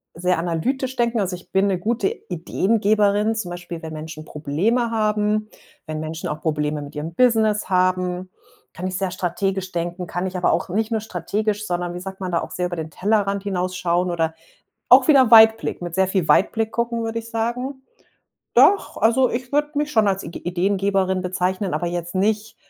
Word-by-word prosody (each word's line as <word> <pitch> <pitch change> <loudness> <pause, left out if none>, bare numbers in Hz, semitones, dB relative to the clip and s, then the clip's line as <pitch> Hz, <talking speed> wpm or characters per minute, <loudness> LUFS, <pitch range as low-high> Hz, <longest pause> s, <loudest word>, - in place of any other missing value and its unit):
sehr 180 0 0
analytisch 255 +11 -2
denken. 235 -1 +1
Also, 190 -3 -1
ich 175 - -15
bin 195 +1 +3
'ne 190 -2 +1
gute 220 +2 0
Ideengeberin, 205 +4 +1
zum 190 -5 -4
Beispiel 175 -1 -7
wenn 160 0 -6
Menschen 155 0 -8
Probleme 185 - 0
haben. 215 -1 0 0.4
Wenn 155 0 -4
Menschen 155 +1 -5
auch 150 - -4
Probleme 150 -1 -1
mit 145 +1 -10
ihrem 155 +3 -5
Business 220 -2 +2
haben 185 0 +1 0.5
kann 185 +2 -4
ich 185 - -3
sehr 190 -2 -2
strategisch 190 +1 -2
denken. 175 +1 -3
Kann 180 +2 -3
ich 185 0 -4
aber 180 - +2
auch - - 0
nicht 220 +5 -1
nur 225 -1 0
strategisch, 210 +2 -2
sondern, 175 0 -2
wie 175 - -5
sagt 190 +1 -8
man 185 -2 -4
da, 170 - +1
auch - - -6
sehr 180 - -2
über 175 - -3
den 160 -1 -5
Tellerrand 200 +1 0
hinausschauen. 180 -2 -1
Oder 165 -2 0 0.5
auch - - +7
wieder 265 -5 +6
Weitblick, 225 -4 +6
mit 175 -1 -5
sehr 190 0 +2
viel 185 -3 -1
Weitblick 220 +2 +3
gucken, 235 -1 -1
würde 225 0 -2
ich 230 0 -10
sagen. 250 +4 -3 0.7
Doch, 400 - +4
also, 235 +4 +3
ich 245 +1 -4
würde 295 +1 +1
mich 295 +1 -1
schon 220 -7 +3
als 195 0 0
Igi 170 - -7
Ideengeberin 190 +1 +1
bezeichnen, 185 0 -1
aber 175 +3 -1
jetzt 175 0 -4
nicht 210 +3 0
190 Hz, 190 wpm, -22 LUFS, 175-220 Hz, 0.7 s, auch